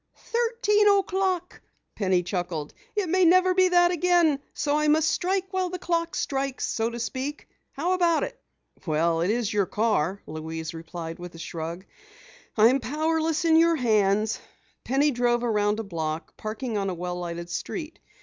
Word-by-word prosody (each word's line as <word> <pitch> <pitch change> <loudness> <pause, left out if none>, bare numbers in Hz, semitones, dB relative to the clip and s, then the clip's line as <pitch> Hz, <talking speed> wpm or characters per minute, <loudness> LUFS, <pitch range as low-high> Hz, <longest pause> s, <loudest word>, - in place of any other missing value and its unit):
"Thirteen 460 -3 +1
o'clock!" 380 -3 +1 0.3
Penny 185 -3 +1
chuckled. 175 -5 -3 0.2
"It 410 -3 0
may 370 +3 +3
never 370 +2 +5
be 370 0 +4
that 350 -1 +4
again, 345 -4 +3
so 290 -1 -1
I 300 0 +2
must 310 +1 +4
strike 380 +2 -1
while 370 -1 0
the 365 - -4
clock 335 -1 -1
strikes, 270 -1 -2
so 225 0 -1
to 235 0 -6
speak. 265 +5 -4 0.3
How 335 +6 -1
about 345 -3 +2
it?" - - -6 0.5
"Well, 165 +1 +1
it's 215 +4 0
your 200 -3 +1
car," 200 -4 0
Louise 160 +1 -6
replied 165 0 -7
with 175 -1 -9
a - - -9
shrug. 165 +2 -6 0.7
"I'm 235 +5 +5
powerless 315 +3 0
in 320 -1 +5
your 335 0 +5
hands." 215 -4 +2 0.4
Penny 280 +4 +2
drove 240 -1 +1
around 210 -2 +1
a - - -2
block, 160 -4 -4
parking 215 +1 -4
on 195 -1 -1
a 185 - -3
well 180 +1 -4
lighted 170 0 -5
street. 315 - -5
250 Hz, 160 wpm, -26 LUFS, -, 0.7 s, never